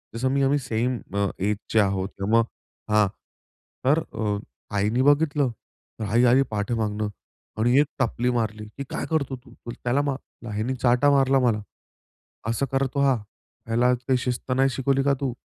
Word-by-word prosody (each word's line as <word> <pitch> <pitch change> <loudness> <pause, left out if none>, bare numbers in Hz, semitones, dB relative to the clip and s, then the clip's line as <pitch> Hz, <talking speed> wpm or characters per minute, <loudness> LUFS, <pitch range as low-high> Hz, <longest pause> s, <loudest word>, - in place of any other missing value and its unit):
जसं 130 +3 0
मी 140 0 +2
आम्ही 140 +2 +3
सेम 125 0 -1 0.2
अ, 100 0 +2
एजचे 105 +3 0
आहोत 95 -1 +1
किंवा 105 +4 +3
मग 115 - +2 0.5
हां, 105 -1 +5 0.8
तर 145 +5 +4
अ, 105 -2 -1 0.4
आईने 105 +5 +2
बघितलं. 145 -1 +3 0.5
तर - - -3
आई 120 +3 +4
आली 125 +2 +5
पाठी 105 +2 -1
मागनं 105 -2 -1 0.5
आणि 120 +3 +4
एक 145 - +5
टपली 125 0 +1
मारली 110 -3 -2
की, 140 - -3
"काय - - -3
करतो 140 -4 0
तू? 125 -1 -16 0.3
त्याला 125 +3 +2
मार" 135 -4 -5
आईनी 110 +5 -1
चाटा 125 +3 +3
मारला 135 -1 +4
मला. 115 -4 +2 0.9
असं 115 +4 0
करतो 135 +1 0
हा, 135 -2 +4 0.5
ह्याला 120 +2 +3
काही 125 +1 0
शिस्त 125 +1 -3
नाही 135 +1 +3
शिकवली 135 0 +1
का 140 0 +3
तू? 130 -3 -1
125 Hz, 165 wpm, -25 LUFS, 110-135 Hz, 0.9 s, हां